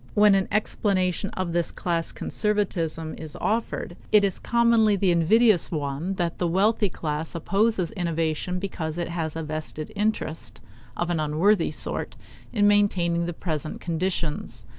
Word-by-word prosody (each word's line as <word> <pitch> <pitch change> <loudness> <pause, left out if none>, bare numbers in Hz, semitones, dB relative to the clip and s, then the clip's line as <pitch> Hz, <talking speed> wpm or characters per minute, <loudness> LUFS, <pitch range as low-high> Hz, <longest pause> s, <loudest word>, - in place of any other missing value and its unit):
When 210 -1 +6
an 195 -1 +2
explanation 195 -2 0
of 185 -2 -2
this 170 -1 +1
class 170 -2 -2
conservatism 170 -7 -1
is 155 -2 -8
offered, 220 -5 -2 0.2
it 210 -1 +6
is 195 -2 0
commonly 235 -3 +3
the 190 -2 +2
invidious 190 +4 +4
one 150 +4 -2
that 175 -2 -2
the 175 - +1
wealthy 205 +4 +2
class 155 -1 -4
opposes 195 +1 +1
innovation 165 0 -1
because 170 -4 -4
it 175 -1 -2
has 165 -2 -3
a 165 - -3
vested 155 0 -5
interest, 205 -6 -2 0.4
of 175 0 -1
an 170 - 0
unworthy 165 +6 +2
sort, 155 - -3 0.4
in 205 -3 +3
maintaining 175 -5 +2
the 175 - -3
present 155 -3 -4
conditions. 170 -2 -3
175 Hz, 145 wpm, -25 LUFS, 160-205 Hz, 0.4 s, When